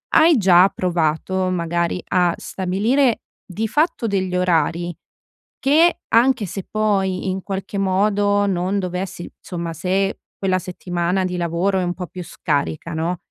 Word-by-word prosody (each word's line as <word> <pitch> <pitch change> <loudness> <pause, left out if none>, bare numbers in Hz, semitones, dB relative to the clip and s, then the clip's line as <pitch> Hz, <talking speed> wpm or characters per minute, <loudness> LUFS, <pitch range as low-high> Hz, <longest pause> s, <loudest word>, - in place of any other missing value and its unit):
hai 320 -1 +6
già 185 -3 +6
provato 180 +2 0
magari 170 0 -1
a 175 -2 +2
stabilire 220 +8 0 0.2
di 210 +4 -3
fatto 300 0 +1
degli 190 -3 -1
orari 175 -1 +1 0.7
che, 320 +5 +4 0.2
anche 240 -1 +4
se 190 +1 -6
poi 195 -3 0
in 185 0 -3
qualche 195 0 -4
modo 205 +1 +2
non 190 +1 0
dovessi 180 -1 -4
somma 170 -2 -5
se 190 +4 -1 0.2
quella 190 -1 +1
settimana 180 0 -2
di 180 0 -3
lavoro 175 +3 0
è - - 0
un 175 0 -1
po' 180 0 -6
più 180 +1 -8
scarica, 155 +1 -2
no, 165 +3 -1
185 Hz, 140 wpm, -21 LUFS, 175-200 Hz, 0.7 s, hai